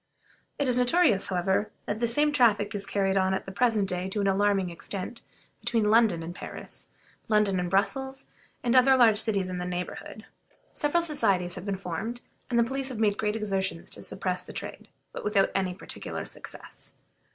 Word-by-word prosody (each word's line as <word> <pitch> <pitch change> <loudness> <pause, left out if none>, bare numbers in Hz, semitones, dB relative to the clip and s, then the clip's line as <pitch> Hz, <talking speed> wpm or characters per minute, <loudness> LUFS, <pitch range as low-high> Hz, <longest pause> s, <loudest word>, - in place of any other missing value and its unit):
It 285 - 0
is 250 -1 +2
notorious, 250 - +4
however, 190 +3 0 0.2
that 210 - -3
the 235 - +1
same 295 +6 +3
traffic 230 -7 +3
is 200 -1 -2
carried 195 -1 +1
on 190 0 +2
at - - -4
the 195 - -7
present 215 -1 +2
day 180 0 -1
to 205 - -2
an 200 - +1
alarming 195 -2 +2
extent 195 +6 -5 0.4
between 220 -3 +1
London 215 -7 +4
and 170 +2 -6
Paris, - - -9 0.4
London 210 -3 +2
and 180 0 -2
Brussels, 265 +8 -1 0.4
and 240 +1 +2
other 260 +1 +6
large 225 -4 +6
cities 200 -5 +2
in 180 -1 -4
the - - -3
neighborhood. 180 +4 -6 0.5
Several 315 +4 +1
societies 195 - +1
have 185 +2 -7
been 195 -1 -1
formed, 195 +7 -5 0.3
and 240 - 0
the 235 - +5
police 265 +3 -2
have 255 - -6
made 210 -2 +1
great 210 0 0
exertions 195 -5 -2
to - - -2
suppress 185 -1 -2
the - - -11
trade, - - -7 0.2
but - - -7
without 200 -2 +2
any 185 -2 -1
particular - - -6
success. - - -9
205 Hz, 185 wpm, -27 LUFS, 190-235 Hz, 0.5 s, other